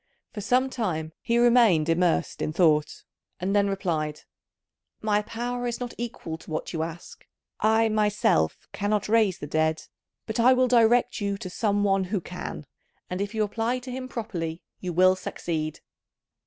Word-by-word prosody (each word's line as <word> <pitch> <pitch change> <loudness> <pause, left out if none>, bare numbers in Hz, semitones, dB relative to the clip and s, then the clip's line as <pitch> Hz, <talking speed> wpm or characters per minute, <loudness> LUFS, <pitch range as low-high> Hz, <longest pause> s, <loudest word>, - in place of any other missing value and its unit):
For 210 - -5
some 255 +4 +2
time 160 -10 -2
he 235 0 +1
remained 235 -10 +5
immersed 170 0 +1
in - - -1
thought, 155 -3 +2 0.4
and 195 +3 -1
then 200 -1 +3
replied, 160 -6 -2 0.8
"My 210 -1 +1
power 245 +3 -3
is 235 - -3
not 245 -1 -5
equal 225 -9 -5
to - - -14
what 155 +3 -4
you 160 - -1
ask. 165 +1 -7 0.4
I 220 +1 +3
myself 210 - +1
cannot 205 -1 0
raise 215 -4 +3
the - - -6
dead; 155 +1 0 0.4
but 220 +1 -4
I 250 +3 +6
will 255 0 +3
direct 240 -1 +3
you 200 -1 -1
to 185 -2 -7
some 205 0 +1
one 195 -1 +2
who 200 +2 -1
can, 180 -3 -7 0.5
and 180 +1 -2
if 205 +2 -3
you 215 - +2
apply 225 +4 -1
to 255 0 -8
him 255 0 -5
properly 175 -9 -4 0.2
you 180 - -4
will 185 +2 +5
succeed." 155 -4 -4
205 Hz, 170 wpm, -26 LUFS, 170-230 Hz, 0.8 s, I